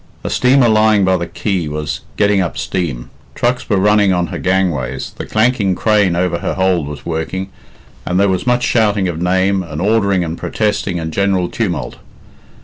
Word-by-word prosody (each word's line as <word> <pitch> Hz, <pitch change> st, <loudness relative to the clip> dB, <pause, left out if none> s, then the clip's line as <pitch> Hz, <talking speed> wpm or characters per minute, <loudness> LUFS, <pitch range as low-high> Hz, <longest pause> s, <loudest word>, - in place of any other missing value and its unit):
A -, -, -3 dB
steamer 130 Hz, 0 st, +4 dB
lying 110 Hz, -2 st, +4 dB
by 95 Hz, 0 st, +3 dB
the 85 Hz, -1 st, -3 dB
quay 95 Hz, -5 st, -2 dB
was 75 Hz, 0 st, -4 dB, 0.2 s
getting 100 Hz, -2 st, +3 dB
up 85 Hz, -, -3 dB
steam; 75 Hz, -10 st, -3 dB, 0.2 s
trucks 125 Hz, +1 st, -1 dB
were 105 Hz, -, +2 dB
running 105 Hz, 0 st, +3 dB
on 90 Hz, -1 st, +1 dB
her -, -, -4 dB
gangways, 85 Hz, -9 st, -1 dB
the -, -, -8 dB
clanking 110 Hz, -4 st, +1 dB
crane 105 Hz, -3 st, +2 dB
over 85 Hz, -1 st, 0 dB
her -, -, -3 dB
hold 95 Hz, -5 st, +1 dB
was 75 Hz, -1 st, -8 dB
working, 85 Hz, +4 st, -3 dB, 0.5 s
and 90 Hz, +1 st, -1 dB
there 100 Hz, -, +4 dB
was 95 Hz, +3 st, -1 dB
much 125 Hz, 0 st, +2 dB
shouting 105 Hz, -6 st, +2 dB
of 85 Hz, -1 st, -4 dB
name, 95 Hz, +2 st, +1 dB
and 80 Hz, -4 st, -6 dB
ordering 100 Hz, -2 st, +2 dB
and 85 Hz, 0 st, -5 dB
protesting, 105 Hz, -4 st, -1 dB
and 80 Hz, -1 st, -5 dB
general 95 Hz, -2 st, +1 dB
tumult. 90 Hz, -, -3 dB
95 Hz, 180 wpm, -16 LUFS, 85-105 Hz, 0.5 s, steamer